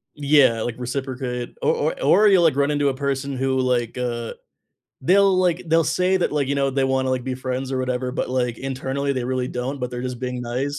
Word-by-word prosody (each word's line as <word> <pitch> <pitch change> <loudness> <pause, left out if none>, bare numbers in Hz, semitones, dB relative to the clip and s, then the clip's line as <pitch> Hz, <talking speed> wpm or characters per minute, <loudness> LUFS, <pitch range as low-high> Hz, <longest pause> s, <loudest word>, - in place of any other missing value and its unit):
Yeah, 140 -6 +4
like 120 +1 -3
reciprocate, 125 -1 -4
or 470 - +3 0.2
or - - -12
or 215 - +5
you'll, 190 -4 +5
like, 160 -5 +4
run 140 0 +2
into 145 -1 +1
a - - -1
person 140 0 -2
who 130 0 0
like, 125 -2 0
uh, 120 -2 -3 0.7
they'll, 195 +6 +4
like 180 -1 +1
they'll 165 +1 +3
say 180 +4 +1
that, 180 - 0
like, 145 -2 0
you 140 - -1
know, 140 -1 +1
they 135 0 0
wanna 130 0 0
like 130 -1 -1
be 130 -1 -2
friends 130 +1 -4
or 130 - -1
whatever, 125 0 -2
but, - - -2
like, 125 -2 -1
internally 135 +1 -2
they 130 -2 -2
really 130 0 -1
don't, 130 +3 -4
but 125 0 -3
they're 125 0 -5
just 125 -1 -5
being 125 -1 -3
nice. 130 +4 -3
130 Hz, 230 wpm, -22 LUFS, 125-145 Hz, 0.7 s, or